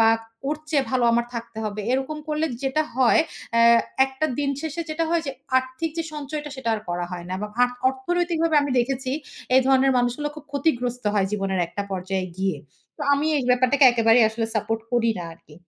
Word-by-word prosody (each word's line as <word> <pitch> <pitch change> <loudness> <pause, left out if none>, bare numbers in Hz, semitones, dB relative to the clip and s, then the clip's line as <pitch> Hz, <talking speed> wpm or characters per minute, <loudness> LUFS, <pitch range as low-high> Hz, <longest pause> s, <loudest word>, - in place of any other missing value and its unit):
বা 225 - +6 0.4
ওর 300 - 0
চেয়ে 280 -3 +2
ভালো 250 -2 +2
আমার 235 0 +1
থাকতে 235 -1 -6
হবে। 210 0 -3
এরকম 270 +4 -1
করলে 305 +1 0 0.2
যেটা 275 +3 +1
হয় 260 +4 +5 0.3
অ্যা 230 - +5 0.4
একটা 265 +4 -2
দিন 285 -1 +1
শেষে 320 +1 -4
যেটা 325 +1 0
হয় 340 -1 +2
যে - - -1 0.3
আর্থিক 260 +5 -4
যে - - +1
সঞ্চয়টা, 295 0 -5
সেটা 260 -3 -4
আর 215 - -4
করা 175 0 -2
হয় 175 -1 -6
না। 185 - -3
বা 210 - -2 0.2
আ - - +9 0.2
অর্থনৈতিকভাবে 330 +4 0
আমি 285 - -2
দেখেছি 260 +1 -1 0.4
এই 260 - +7
ধরনের 270 0 +4
মানুষগুলো 245 +5 0
খুব 305 - -11
ক্ষতিগ্রস্ত 250 -5 -1
হয় 195 -2 +2
জীবনের 195 -2 -1
একটা 185 +4 -4
পর্যায়ে 190 0 -2
গিয়ে। 190 -4 -1 0.4
তো 300 - -6
আমি 285 +2 -1
এই 265 - -2
ব্যাপারটাকে 255 +3 +4
একেবারেই 230 -1 +5
আসলে 225 +1 -2
সাপোর্ট 220 +1 -1
করি 230 -1 +3
না 175 - -5
আরকি। 155 -2 -18
255 Hz, 195 wpm, -24 LUFS, 225-295 Hz, 0.4 s, আ